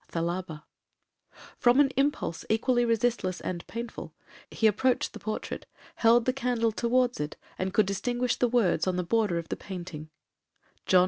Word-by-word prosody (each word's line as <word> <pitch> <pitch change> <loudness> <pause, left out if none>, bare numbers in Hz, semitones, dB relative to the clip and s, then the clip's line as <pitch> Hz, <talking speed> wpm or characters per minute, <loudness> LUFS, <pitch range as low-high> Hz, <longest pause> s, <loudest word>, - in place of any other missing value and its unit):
'—THALABA. 170 -2 -3 1.0
From 245 +2 +5
an 280 -2 +5
impulse 275 - 0
equally 240 +2 +2
resistless 230 -5 0
and 175 -2 -5
painful, 235 0 -7 0.3
he 225 - -1
approached 245 +4 +2
the - - -8
portrait, 215 0 -5 0.3
held 230 0 +5
the 255 - +2
candle 245 -3 0
towards 245 +2 +1
it, 150 0 -4 0.2
and 185 +1 -1
could 215 +2 +3
distinguish 240 +5 -1
the 245 - +3
words 210 -8 +2
on 185 - +1
the 180 - 0
border 210 -2 +1
of 165 -1 -5
the - - -1
painting,—Jno. 175 0 -4
225 Hz, 150 wpm, -28 LUFS, 180-245 Hz, 1.0 s, From